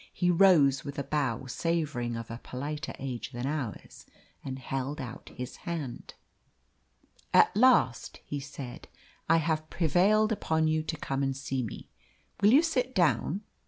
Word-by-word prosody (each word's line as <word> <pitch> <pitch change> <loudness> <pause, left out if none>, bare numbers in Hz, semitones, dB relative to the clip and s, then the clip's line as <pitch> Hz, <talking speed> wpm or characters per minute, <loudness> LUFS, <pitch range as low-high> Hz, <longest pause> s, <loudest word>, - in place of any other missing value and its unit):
He 180 -1 +1
rose 165 -7 +5
with 140 -1 -7
a 140 - -1
bow 140 -4 -1
savouring 140 -5 -1
of 115 0 -7
a 115 - -6
politer 145 +4 -5
age 130 -1 -5
than 120 +1 -4
ours, 140 -6 -5 0.4
and 130 -1 -5
held 135 +2 -4
out 125 -4 -7
his 125 0 -6
hand. 155 -8 -6 1.2
"At - - +6
last," 230 - +3
he 145 - -4
said, 135 -2 -8 0.4
"I 165 - +6
have 155 -1 -1
prevailed 195 +7 +3
upon 160 -6 +1
you 155 0 +1
to 160 +1 -4
come 135 -2 -2
and 135 -1 -1
see 135 -1 -2
me. 115 - -6 0.5
Will 205 +1 +6
you 285 +6 +7
sit 260 -6 -1
down? 175 +1 +2
145 Hz, 155 wpm, -29 LUFS, 130-170 Hz, 1.2 s, you